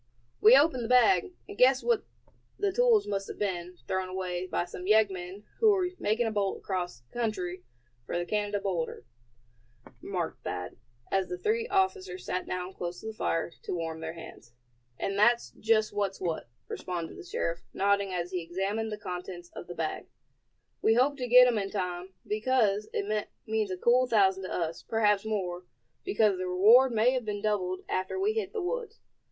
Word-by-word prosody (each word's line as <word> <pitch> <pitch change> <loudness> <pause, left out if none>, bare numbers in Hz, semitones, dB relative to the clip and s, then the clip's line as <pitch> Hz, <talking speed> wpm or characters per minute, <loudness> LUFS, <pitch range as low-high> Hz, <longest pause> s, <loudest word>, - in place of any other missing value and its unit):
"We 230 +5 +9
opened 275 -4 +3
the - - -3
bag, 365 +10 +5 0.2
and 405 - -8
guessed 260 -2 +5
that 470 -3 +2 0.6
the 405 -1 +1
tools 465 0 +4
must 195 -1 -2
have - - -7
been 180 -3 -3
thrown 190 0 -1
away 185 -1 -3
by 175 - -1
some 180 +1 -8
yeggmen 195 -2 +2 0.2
who 445 -1 +6
were 375 -3 +3
making 220 +3 +1
a 225 - 0
bolt 200 -2 0
across 175 -10 -4
country 200 -7 -2 0.5
for - - -2
the 175 - -1
Canada 205 +1 -1
border," 175 -10 -3 1.0
remarked 180 -4 -4
Thad, 90 0 -5 0.3
as 195 -1 +1
the 180 - -4
three 455 - 0
officers 380 -2 0
sat 185 - -2
down 185 +1 -4
close 175 -1 -5
to - - -12
the 220 - -4
fire 165 -5 -1
to - - -4
warm 165 -1 -4
their 160 0 -5
hands. 140 -7 -12 0.4
"And 195 0 -2
that's 235 +3 +4
just 215 -1 +1
what's 200 -2 -1
what," 165 -9 -3 0.2
responded 175 -3 -5
the 380 - -9
sheriff, 170 - -2
nodding 200 0 +1
as 180 0 -3
he 180 -2 -2
examined 195 +6 -2
the 210 - -4
contents 180 -2 -7
of - - -8
the 175 - -7
bag. 160 -1 -3 0.7
"We 225 - +4
hope 265 +4 +3
to 250 -2 -3
get 250 +1 +9
'em 240 -3 +2
in 195 -1 -3
time, 185 -1 -4
because 215 -2 +1
it 210 +1 -1 0.2
means 220 -2 0
a 185 - -3
cool 250 +6 +4
thousand 190 -5 +3
to - - -6
us, 165 -1 -2
perhaps 210 -2 +2
more, 185 -4 -3 0.4
because 215 - +2
the 185 - -2
reward 220 +9 +6
may 230 +2 +3
have 255 -1 -1
been 205 -1 -4
doubled 185 -4 0
after 185 - -2
we 415 +3 +2
hit 435 -4 -2
the 435 -4 -3
woods. 475 +6 -4
205 Hz, 185 wpm, -29 LUFS, 180-240 Hz, 1.0 s, We